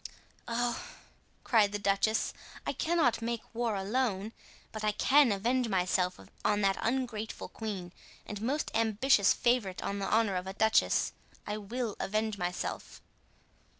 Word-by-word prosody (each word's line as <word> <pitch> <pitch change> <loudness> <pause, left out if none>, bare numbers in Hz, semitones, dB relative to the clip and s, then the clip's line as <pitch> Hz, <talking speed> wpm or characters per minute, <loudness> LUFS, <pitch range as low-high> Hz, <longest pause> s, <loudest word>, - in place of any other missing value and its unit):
"Oh," 240 0 -1 0.6
cried 210 -5 +3
the - - 0
duchess, 200 +2 +1 0.3
"I - - -1
cannot 320 -9 +1
make 230 0 -2
war 230 -2 0
alone, 210 0 -1 0.4
but 215 -1 -6
I 210 -1 +2
can 275 +2 +5
avenge 240 +5 +1
myself 180 -1 +1 0.2
on 210 0 +2
that 195 -1 +2
ungrateful 230 -3 -2
queen 195 -6 -5 0.3
and 210 -1 -6
most 275 +7 -1
ambitious 225 -1 +4
favorite 240 -7 +1
on 200 0 -2
the 195 - -2
honor 220 -4 +2
of 180 +1 -4
a 190 - -4
duchess, 220 +2 +3 0.3
I 210 0 -3
will 220 +1 -3
avenge 215 0 -1
myself." 180 0 -4
215 Hz, 140 wpm, -31 LUFS, 200-240 Hz, 0.6 s, can